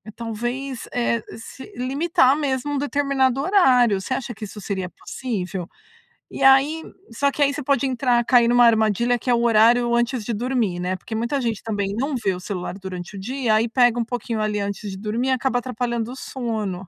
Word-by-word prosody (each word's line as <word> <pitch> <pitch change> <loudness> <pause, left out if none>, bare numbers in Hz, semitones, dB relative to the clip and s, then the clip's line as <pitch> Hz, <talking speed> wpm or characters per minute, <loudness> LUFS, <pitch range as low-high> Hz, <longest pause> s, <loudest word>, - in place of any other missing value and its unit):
talvez, 240 +3 -4
eh 235 -1 0 0.2
se 260 - -11
limitar 275 +2 +2
mesmo 280 -1 -1
um - - 0
determinado 275 -2 +1
horário. 255 - +4
Você 260 - -3
acha 255 -2 -4
que 215 - -7
isso 210 +1 -10
seria 190 -2 -3
possível? 190 -7 -5 0.7
E - - -3
aí 275 +4 +5 0.3
só 280 +5 +1
que, 295 - -5
aí, 280 0 +3
você 300 - -4
pode 275 0 +1
entrar 250 -2 +1
cair 240 -2 +5
numa 245 +1 +5
armadilha, 230 +1 +3
que 250 - -5
é - - +5
o 235 - 0
horário 235 +1 +4
antes 240 0 0
de 235 - -2
dormir, 225 -5 -1
né? 180 +1 -2
Porque 210 - -9
muita 235 +5 -1
gente 230 -4 -2
também 200 -3 -2
não 275 +5 -1
vê 210 -6 0
o - - -7
celular 180 -2 -5
durante 185 0 -7
o - - -6
dia, 240 +2 0
aí 220 +2 +2
pega 245 0 +3
um 235 - 0
pouquinho 235 -1 -3
ali 215 -1 -1
antes 200 0 -4
de 190 - -7
dormir, 220 +5 -2
e - - +2
acaba 260 -1 +1
atrapalhando 235 -2 -3
o - - -7
sono. 215 -9 -4
240 Hz, 205 wpm, -22 LUFS, 215-260 Hz, 0.7 s, aí